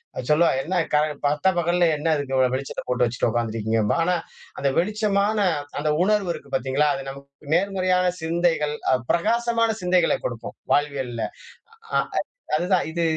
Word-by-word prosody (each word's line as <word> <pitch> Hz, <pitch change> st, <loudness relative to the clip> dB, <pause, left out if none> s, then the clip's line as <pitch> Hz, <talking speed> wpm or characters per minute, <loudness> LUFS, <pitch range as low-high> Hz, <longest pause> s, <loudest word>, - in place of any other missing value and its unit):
அது 125 Hz, -, -5 dB
சொல்லுவா, 165 Hz, +3 st, +5 dB
"என்ன 185 Hz, +6 st, -3 dB, 0.2 s
கால 150 Hz, 0 st, +4 dB, 0.2 s
பட்ட 150 Hz, +5 st, +1 dB
பகல்ல 175 Hz, 0 st, +2 dB
என்ன 150 Hz, +2 st, -3 dB
அதுக்கு 140 Hz, -2 st, -3 dB
இவ்வளவு 130 Hz, -1 st, +3 dB
வெளிச்சத்தப் 135 Hz, +1 st, -4 dB
போட்டு 125 Hz, 0 st, +2 dB
வச்சிட்டு 120 Hz, 0 st, -1 dB
உட்கார்ந்திருக்கீங்கம்பா". 110 Hz, -2 st, 0 dB
ஆனா, 180 Hz, +2 st, +1 dB, 0.4 s
அந்த 140 Hz, -, 0 dB
வெளிச்சமான 210 Hz, +2 st, +1 dB, 0.4 s
அந்த 150 Hz, +1 st, 0 dB
உணர்வு 205 Hz, -1 st, +1 dB
இருக்கு 140 Hz, -3 st, -11 dB
பாத்தீங்களா? 135 Hz, +3 st, +1 dB
அது 135 Hz, -, -5 dB
நமக்கு 140 Hz, +1 st, -12 dB
நேர்மறையான 185 Hz, -1 st, +1 dB
சிந்தைகள் 160 Hz, -2 st, +1 dB, 0.2 s
அ -, -, +5 dB, 0.2 s
பிரகாசமான 230 Hz, +4 st, +1 dB
சிந்தைகளைக் 180 Hz, -1 st, +2 dB
கொடுக்கும் 120 Hz, -2 st, -5 dB, 0.2 s
வாழ்வியல்ல. 135 Hz, -5 st, -1 dB, 0.7 s
அ -, -, +5 dB, 0.6 s
அதுதான் 180 Hz, +3 st, +2 dB
இது 170 Hz, +1 st, -2 dB
155 Hz, 145 wpm, -23 LUFS, 135-185 Hz, 0.7 s, சொல்லுவா